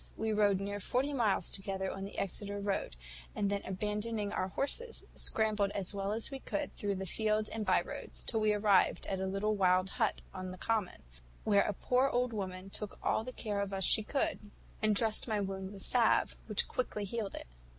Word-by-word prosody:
We 220 0 0
rode 205 -2 +4
near 200 +1 -3
forty 260 +8 0
miles 215 -9 +2
together 195 -1 -2
on 195 0 -5
the 200 - -9
Exeter 200 +1 -2
road, 200 - -1 0.4
and 200 -1 +1
then 200 0 0
abandoning 210 +2 -2
our 185 - 0
horses, 455 - -1
scrambled 215 -2 +2
as 195 0 -2
well 200 0 -1
as 225 +5 -2
we 270 - -5
could 200 -5 -3
through 200 -1 -1
the 190 0 -4
fields 215 +3 +1
and 220 -2 -4
bye 185 - +4
roads, - - -6
till 225 - +1
we 215 -1 +3
arrived 205 -2 +3
at 190 - -2
a 190 - -1
little 200 +3 0
wild 185 -1 +3
hut 220 - +2
on 185 -1 -5
a 185 - -8
common, 215 -2 -1 0.4
where 200 -2 +5
a - - 0
poor 255 +7 +2
old 250 -1 +1
woman 190 -2 -4
took 210 0 -5
all - - +2
the 255 - -6
care 210 -5 -3
of 200 -1 -2
us 195 0 0
she 215 - +6
could, 275 +6 0 0.4
and 215 -1 +3
dressed 220 +2 +2
my 215 -2 +1
wound 190 -1 -3
with 195 -2 -7
salve, 240 -3 +3
which 210 -3 +1
quickly 230 -4 -2
healed 210 0 -3
it." - - -6
205 Hz, 205 wpm, -33 LUFS, 195-220 Hz, 0.4 s, she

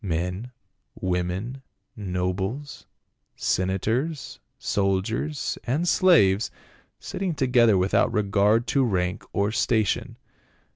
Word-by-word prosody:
Men, 90 +6 -3 0.5
women, 95 +8 -2 0.3
nobles, 95 +8 -3 0.5
senators, 115 - -1 0.2
soldiers 100 +9 -1
and 150 +8 0
slaves 115 - +4 0.5
sitting 185 -4 -3
together 120 -6 +4
without 95 +2 +2
regard 105 +2 +2
to 140 - +3
rank 90 -6 -1
or 100 +1 0
station. 110 -1 0
105 Hz, 85 wpm, -25 LUFS, 95-130 Hz, 0.5 s, slaves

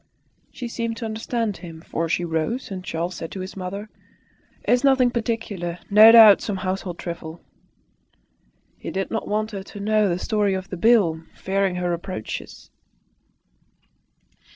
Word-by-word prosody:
She 250 - -6
seemed 230 -1 -3
to 230 - -5
understand 225 -1 -2
him, 165 -3 -10
for 165 0 -3
she 175 +2 0
rose; 170 +10 -2
and 185 -1 -5
Charles 170 +1 -3
said 165 -2 -7
to 195 - -6
his 185 +1 -7
mother, 195 +3 -5 0.8
"It - - 0
is 245 +2 +3
nothing 265 -3 +4
particular. 215 -7 -3
No 215 +2 +9
doubt, 220 -3 +9
some 205 -3 -3
household 185 -2 -3
trifle." 170 -1 -7 1.4
He - - -6
did 195 0 -3
not 225 - -3
want 215 +1 -1
her 200 -2 -5
to 205 +2 -11
know 215 0 +2
the 175 - 0
story 205 0 0
of 190 0 -6
the - - -3
bill, 195 -7 +3
fearing 195 -1 -1
her 180 -1 -1
reproaches. 170 - -6
195 Hz, 155 wpm, -23 LUFS, 175-225 Hz, 1.4 s, No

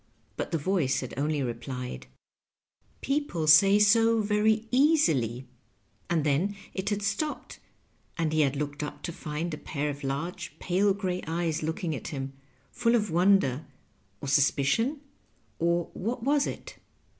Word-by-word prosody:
But - - -4
the 165 - +1
voice 160 -3 0
had 130 - -6
only 145 +1 0
replied, 120 - -5 0.9
"People 275 - -1
say 195 +7 +7
so 225 +2 +4
very 215 +2 +2
easily," 245 - +2 0.6
and 165 -3 +1
then 155 +8 +1 0.2
it 190 +1 -2
had 205 -1 -2
stopped, 295 +10 -3 0.6
and 160 -2 0
he 155 - +3
had 140 -2 +2
looked 145 0 -4
up 150 - -6
to 170 - -3
find 155 +2 -4
a 150 - -5
pair 150 -1 -3
of 140 0 -9
large 140 +6 -4
pale 190 +2 +1
gray 185 -2 -2
eyes 165 -1 -1
looking 160 +1 -2
at 125 - -7
him, 135 -2 -5 0.4
full 235 -1 +2
of 210 -5 0
wonder, 170 -6 +3 0.5
or - - -5
sus 140 0 +4
picion 225 - 0 0.3
— - - -39
or 170 0 0
what 230 +4 -3
was 285 +2 +2
it - - -7
170 Hz, 155 wpm, -28 LUFS, 145-205 Hz, 0.9 s, say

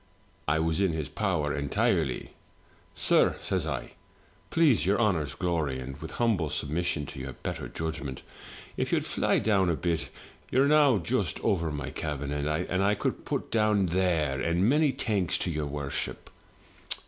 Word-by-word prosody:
I 75 +2 +3
was 80 +3 +1
in 95 -4 +2
his 80 -2 -2
power 85 -8 0
entirely; 80 - 0 0.6
*sir/ - - +3
says - - -1
I, - - -4 0.6
'please 145 - +4
your 100 +5 +2
honour's 90 -10 +1
glory, 80 -7 -1
and 65 +1 -6
with 80 0 -7
humble 105 -10 +1
submission 75 +1 -1
to - - -8
your 65 0 -5
better - - -5
judg 80 0 -4
ment, 65 -2 -6 0.5
if - - -1
you'd - - +1
fly - - +1
down 95 -4 +2
a 85 - +2
bit, 85 0 -1 0.4
you're 130 +2 +4
now 145 -5 +5
just 85 -4 -1
over 85 -4 +1
my 75 -1 -4
cabin, 75 -2 -3
and 75 +1 -1
I 95 +6 +1
could - - -1
be - - -19
put - - -3
down 105 -3 +3
there, 85 -6 +1
and 85 +7 +2
many 150 +4 +4
thanks 105 -9 0
to 90 - -2
your 75 -2 -2
worship.' 70 -1 -4
85 Hz, 165 wpm, -28 LUFS, 75-100 Hz, 0.6 s, now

